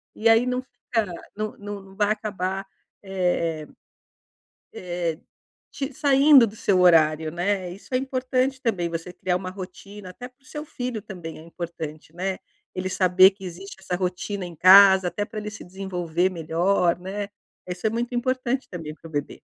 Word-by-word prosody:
E 220 - +1
aí 225 +2 +5
não 250 0 -1
fica 230 -3 -2 0.3
não 215 0 -4
não 200 -2 -8
vai 210 +1 +2
acabar, 195 -3 -3 0.4
eh 175 -5 -1 1.1
eh 175 -2 -2
eh 155 - -15 0.5
te 275 0 -4
saindo 275 -1 +6
do 210 - -7
seu 195 -4 +2
horário, 160 -3 +5
né? 180 +1 -1
Isso 195 +7 -12
é - - +4
importante 260 0 -1
também, 190 -8 0
você 170 +2 -5
criar 180 0 -1
uma 185 0 -6
rotina, 190 +1 -9
até 245 +7 -9
para 255 +2 -28
o - - -28
seu 300 +3 -7
filho 250 -7 -4
também 180 -7 -8
é - - -12
importante, 165 -2 -7
né, 185 +2 -3 0.4
ele 185 0 -2
saber 185 0 +6
que 195 -1 -12
existe 185 +3 -8
essa 185 -1 -3
rotina 185 +2 -3
em 175 - -8
casa 190 +1 +8
até 205 +3 -2
pra 215 +1 -6
ele 210 0 -5
se 220 - -10
desenvolver 180 -2 -1
melhor, 175 +1 +1
né, 200 +2 -5 0.4
isso 180 +4 -2
é - - +2
muito 235 +3 -3
importante 255 +1 -1
também 165 -4 -6
para 165 - -13
o 160 - -14
bebê. 145 -1 -4
190 Hz, 175 wpm, -24 LUFS, 175-220 Hz, 1.1 s, casa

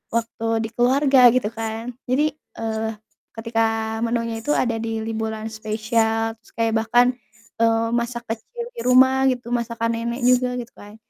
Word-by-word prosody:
waktu 230 0 -2 0.2
di 225 - -4
keluarga 260 +2 +5
gitu 230 -4 0
kan, 225 +1 -4 0.2
jadi, 290 +5 +2 0.2
eee, 220 0 -3 0.4
ketika 225 -1 -1
menunya 230 0 -1
itu 295 +7 0
ada 230 -2 0
di 225 -1 -3
liburan 220 0 -4
spesial, 225 +1 -1
terus - - -23
kayak 225 0 +1
bahkan, 245 +2 +4 0.5
eee, 230 0 +3
masak 235 0 -2
kecil 225 - -6 0.3
di 470 - -5
rumah 260 +1 +5
gitu, 245 -1 -5
masakan 230 -1 -1
nenek 235 +2 -3
juga 250 0 +3
gitu 240 -1 -8
kan. 205 +1 -13
230 Hz, 150 wpm, -22 LUFS, 225-245 Hz, 0.5 s, keluarga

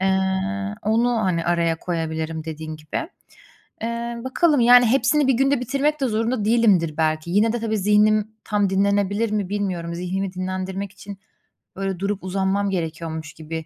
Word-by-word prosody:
Eee, 190 0 +2 0.6
onu, 230 +3 +2
hani, 175 -4 0
araya 170 -1 +1
koyabilirim 160 -2 -3
dediğin 155 0 -6
gibi. 155 - -5 0.7
Eee, 235 +1 -3
bakalım, 290 +3 +2
yani, 245 +1 +7
hepsini 270 +4 +3
bir 265 - +4
günde 270 +2 +2
bitirmek 280 +5 0
de 265 - +2
zorunda 225 0 -1
değilimdir 200 -9 +3
belki. 155 +1 0
Yine 215 +4 +3
de, 240 - -1
tabii, 220 -1 -1
zihnim 210 +1 +3
tam 205 -2 +1
dinlenebilir 200 +2 +1
mi, 205 -3 -1
bilmiyorum. 185 -5 -2
Zihnimi 185 +2 -3
dinlendirmek 185 +1 -4
için, 200 -1 -10 0.6
böyle, 195 -2 -3
durup 200 0 -2
uzanmam 195 +2 0
gerekiyormuş 160 -3 -4
gibi 160 0 -6
195 Hz, 150 wpm, -22 LUFS, 170-225 Hz, 0.7 s, yani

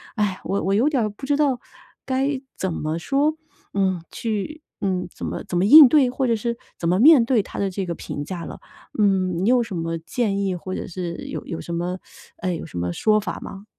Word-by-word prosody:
唉， 205 -4 0
我 200 - -1
我 195 - +1
有 240 +8 +3
点 275 -5 +1
儿 215 - 0
不 205 +7 -9
知 285 +1 +2
道 275 -5 +2 0.5
该 270 +1 0 0.2
怎 190 - -2
么 155 +1 -2
说？ 285 - +1 0.4
嗯， 190 -3 +1
去， 230 +8 -3 0.2
嗯， 185 -2 -1
怎 - - -6
么 - - -4
怎 190 -3 -2
么 180 - +3
应 295 +4 +11
对？ 270 -3 +4
或 260 +1 -1
者 230 - +2
是 235 +2 -2 0.2
怎 170 - -2
么 180 +2 +2
面 275 -1 +7
对 240 -2 +3
他 - - -10
的 200 - 0
这 195 +1 -3
个 170 -1 -3
评 145 - -5
价 170 +1 -6
了？ - - -8 0.4
嗯， 185 -3 +2
你 210 - +3
有 250 -1 +4
什 225 -5 -6
么 165 0 -2
建 200 +5 -1
议， 195 -2 0
或 185 +2 -5
者 - - -5
是 175 -2 -5
有 - - -5
有 165 - -4
什 170 - -6
么， 175 +2 -2 0.4
呃， 185 -2 -2
有 - - -6
什 155 - -9
么 85 0 -2
说 215 - +3
法 210 - -5
吗？ 195 +2 -9
200 Hz, 250 characters per minute, -23 LUFS, 180-245 Hz, 0.5 s, 应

